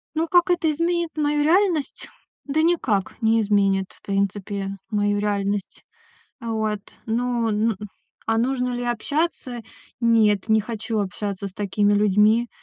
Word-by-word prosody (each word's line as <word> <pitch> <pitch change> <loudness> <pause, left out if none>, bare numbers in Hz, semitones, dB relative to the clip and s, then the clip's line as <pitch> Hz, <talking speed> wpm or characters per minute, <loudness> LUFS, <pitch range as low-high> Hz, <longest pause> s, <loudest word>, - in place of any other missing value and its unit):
Ну 325 +2 0
как 350 +2 +4
это 345 -2 +2
изменит 340 +2 0
мою 295 -1 +1
реальность? 335 -3 +1 0.4
Да 290 +2 +1
никак 260 - 0
не 225 0 +3
изменит, 195 -2 +1
в - - -21
принципе, 200 0 -2
мою 205 -1 +1
реальность. 205 -1 -2 0.6
А 230 - -5
вот. 215 -1 -1 0.3
Ну 235 0 0
н 215 0 +1 0.5
А 225 0 +1
нужно 250 +1 0
ли 245 0 -3
общаться? 250 +1 -2 0.4
Нет, 225 -4 +3
не 220 0 +4
хочу 225 +1 -4
общаться 200 0 -3
с - - -15
такими 205 +1 +1
людьми. 210 +3 +3
220 Hz, 140 wpm, -23 LUFS, 205-270 Hz, 0.6 s, как